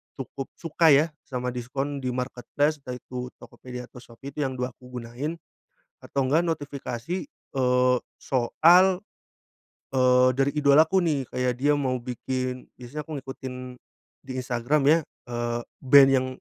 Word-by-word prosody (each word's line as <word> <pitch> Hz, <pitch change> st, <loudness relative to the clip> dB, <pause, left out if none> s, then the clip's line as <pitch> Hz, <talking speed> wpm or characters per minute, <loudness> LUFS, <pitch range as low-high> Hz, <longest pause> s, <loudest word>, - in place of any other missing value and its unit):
cukup 135 Hz, 0 st, -6 dB
suka 165 Hz, 0 st, +3 dB
ya 145 Hz, +3 st, +6 dB, 0.2 s
sama 125 Hz, -1 st, -3 dB
diskon 135 Hz, +4 st, -3 dB
di-marketplace, 130 Hz, +4 st, -1 dB
yaitu 125 Hz, 0 st, -6 dB
Tokopedia 125 Hz, -1 st, -9 dB
atau 125 Hz, -, -13 dB
Shopee 125 Hz, +4 st, -11 dB
itu 150 Hz, -, -1 dB
yang 130 Hz, -1 st, -2 dB
2 125 Hz, 0 st, -2 dB
aku 125 Hz, 0 st, -16 dB
gunain. 130 Hz, +8 st, -5 dB, 0.6 s
Atau 135 Hz, -2 st, -1 dB
enggak 155 Hz, +6 st, +3 dB
notifikasi, 145 Hz, 0 st, -3 dB
eee, 125 Hz, -1 st, +1 dB, 0.2 s
soal, 160 Hz, +8 st, +5 dB, 1.1 s
eee, 125 Hz, -1 st, +5 dB
dari 135 Hz, +1 st, +3 dB
idolaku 155 Hz, +6 st, +5 dB
nih, 145 Hz, -6 st, 0 dB
kayak 125 Hz, -1 st, -1 dB
dia 145 Hz, +3 st, +3 dB
mau 130 Hz, -3 st, 0 dB
bikin 125 Hz, +1 st, -4 dB
biasanya 125 Hz, +5 st, -6 dB
aku 155 Hz, -3 st, -5 dB
ngikutin, 130 Hz, -1 st, -7 dB, 0.7 s
di -, -, -8 dB
Instagram 125 Hz, +3 st, 0 dB
ya, 155 Hz, +4 st, +6 dB, 0.3 s
eee, 120 Hz, 0 st, -1 dB, 0.2 s
band 135 Hz, 0 st, +7 dB
yang 130 Hz, -1 st, +3 dB
130 Hz, 135 wpm, -26 LUFS, 125-145 Hz, 1.1 s, band